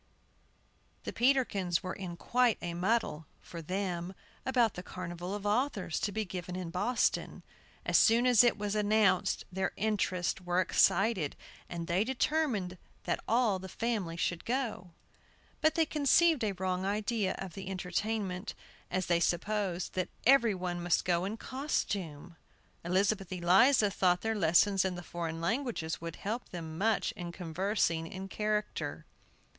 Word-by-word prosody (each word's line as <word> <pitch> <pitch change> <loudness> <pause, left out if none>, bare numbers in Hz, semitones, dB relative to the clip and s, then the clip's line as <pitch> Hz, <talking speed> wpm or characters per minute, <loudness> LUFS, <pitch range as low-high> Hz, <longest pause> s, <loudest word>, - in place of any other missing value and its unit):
THE - - -5
Peterkins 220 -9 +2
were 185 - -3
in 180 -3 -6
quite 245 +3 +2
a 175 -1 -4
muddle 180 -4 0
(for 170 - -9
them) 180 +1 -3 0.3
about 245 -5 +3
the 180 - -6
carnival 180 +1 -6
of 205 0 -7
authors, 210 - 0
to 205 - -1
be 220 +2 -2
given 180 -1 -6
in 180 -2 -5
Boston. 235 +8 0 0.4
As - - +4
soon 235 +2 +5
as 245 -2 +7
it 240 -2 +3
was 205 -1 -2
announced, 210 -3 +2
their 190 +1 -1
interests 195 -4 0
were 180 0 0
excited, 190 -3 +2 0.3
and 170 -1 -4
they 175 +4 +1
determined 240 - 0 0.2
that - - -1
all 225 -5 +2
the 190 0 -8
family 210 -8 -2
should 170 -1 -1
go. 235 -7 -2 0.7
But 315 0 +3
they 325 - +3
conceived 305 0 +3
a 205 -2 0
wrong 185 0 -2
idea 205 0 0
of 190 -3 -6
the 195 -1 -7
entertainment, 190 +1 -3 0.3
as 185 0 -1
they 170 -1 +2
supposed 185 0 -1
that 185 -1 -1 0.2
every 235 -5 +5
one 180 -1 -3
must 175 0 +1
go 175 0 +1
in 210 +3 -4
costume. 190 - -3 0.5
Elizabeth 195 +2 +1
Eliza 195 +6 +4
thought 180 -2 +2
their 225 0 0
lessons 195 +1 +3
in 190 -1 -1
the 175 - -7
foreign 165 -1 -4
languages 195 - -2
would 165 -1 -5
help 225 +5 -4
them 160 -3 -7
much 220 +2 +1
in 175 -4 -7
conversing 170 -1 -1
in 190 +3 -7
character. 210 +1 -2
190 Hz, 150 wpm, -31 LUFS, 175-220 Hz, 0.7 s, as